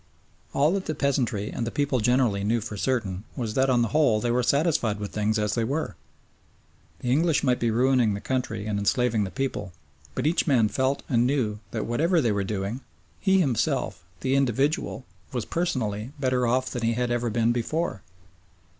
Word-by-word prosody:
All 145 +3 +3
that 195 0 -2
the 155 - -2
peasantry 125 -8 0
and 120 - -3
the 115 - -1
people 140 -1 0
generally 115 -3 +2
knew 115 +3 +1
for 110 -1 -6
certain 105 -5 -1
was 115 -4 -3
that 135 +2 +2
on 120 -2 +3
the 115 - -1
whole 135 -5 +3
they 120 +2 0
were 125 +1 +2
satisfied 140 -6 +1
with 105 -1 -5
things 105 +1 0
as 105 -1 0
they 115 - 0
were. 135 - -2 1.1
The 125 - -1
English 160 +3 +2
might 125 -3 +2
be 120 - +1
ruining 120 -2 +3
the - - -4
country 120 -4 -2
and 105 -1 -1
enslaving 110 +1 +1
the - - -4
people, 135 -7 -3 0.4
but - - -2
each 165 +3 +2
man 120 -7 +4
felt 130 +5 0
and 120 -1 +2
knew 120 -7 0
that 110 -2 -3
whatever 165 +9 +2
they 120 -7 +2
were 100 -1 0
doing, 100 +5 -3 0.4
he 190 -1 +3
himself, 130 -9 0 0.2
the 130 - 0
individual, 135 +1 0 0.3
was 120 -4 -2
personally 125 -8 -2
better 130 -2 +1
off 130 +2 +1
than 125 - -3
he 115 0 +1
had 120 +1 -1
ever 120 0 0
been 115 +1 +2
before. 120 - -2
120 Hz, 190 wpm, -26 LUFS, 110-135 Hz, 1.1 s, man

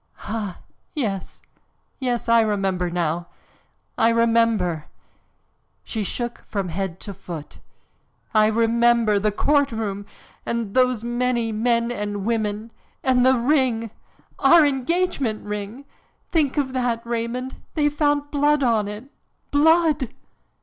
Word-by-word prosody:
"Ah! 205 -4 -4 0.4
Yes, 205 - -3 0.6
yes, 245 -3 -1
I 230 0 +5
remember 195 -4 0
now! 170 0 -1 0.7
I 225 - +5
remember!" 230 -8 +2 1.0
She 220 -2 -3
shook 240 +4 -4
from 195 -4 -3
head 185 0 -4
to 200 - -7
foot. 175 -5 -9 0.7
"I 215 -1 +5
remember! 230 -1 +3
The 210 +1 +1
courtroom! 220 -6 0 0.4
And 230 -4 -3
those 255 -3 +2
many 240 -1 0
men 235 +2 +1
and 205 -3 -3
women! 220 -1 -1 0.3
And 255 -1 +3
the 260 0 +5
ring 240 -4 +1 0.5
our 310 +3 +7
engagement 275 -4 0
ring 210 +6 -5 0.5
think 300 -4 +1
of 265 -3 0
that, 245 -3 -1
Raymond! 235 +2 -3 0.2
They 300 -2 +3
found 290 -1 0
blood 290 0 +2
on 225 -4 +2
it, 210 +2 -6 0.5
blood!" 310 -3 +3
230 Hz, 115 wpm, -23 LUFS, 210-260 Hz, 1.0 s, our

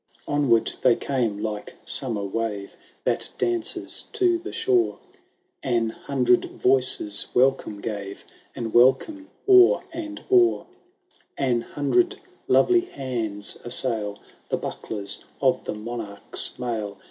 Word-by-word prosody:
Onward 140 -6 +2
they 125 -2 +5
came, 120 -7 -1
like 105 0 -5
summer 115 -7 +1
wave 100 0 -3 0.3
That - - 0
dances 350 -2 -1
to 355 -2 +2
the 360 +3 -7
shore; 365 -1 +1 0.6
An 115 -4 0
hundred 125 -1 +1
voices 125 -5 +1
welcome 125 -5 +2
gave, 100 -2 -5 0.3
And 115 -2 -4
welcome 135 - +3 0.2
o*er 380 +4 +7
and 310 -2 -6
o'er! 360 -2 +4 0.7
An 125 -4 +1
hundred 145 - 0 0.3
lovely 360 -1 +5
hands 120 - -4
assail 110 -4 0 0.3
The - - +1
bucklers 100 -2 -4 0.2
of 130 -2 +2
the - - -3
monarch's 105 -2 -4
mail. 110 -5 -3
125 Hz, 110 wpm, -24 LUFS, 110-145 Hz, 0.7 s, o*er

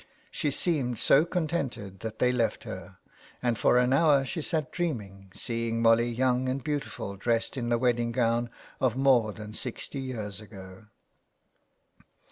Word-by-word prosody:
She 150 - -1
seemed 135 -5 0
so 140 +7 +5
contented 140 - -3
that 110 +1 -6
they 125 - +3
left 120 -3 0
her, 95 -4 -8 0.4
and 120 -2 +1
for 120 - +3
an 125 +1 +3
hour 140 -2 +4
she 160 - -3
sat 155 -2 -1
dreaming, 105 - -4
seeing 115 -1 -2
Molly 115 +1 +4
young 125 +1 +1
and 130 0 -2
beautifully 145 -9 -4
dressed 115 +5 0
in 120 -3 -2
the 120 - +3
wedding 120 -1 +1
gown 120 0 +1 0.3
of 130 -2 +1
more 130 -5 +4
than 105 0 -9
sixty 130 +3 -5
years 110 -6 -5
ago. 95 -1 -12
120 Hz, 150 wpm, -28 LUFS, 110-135 Hz, 0.4 s, so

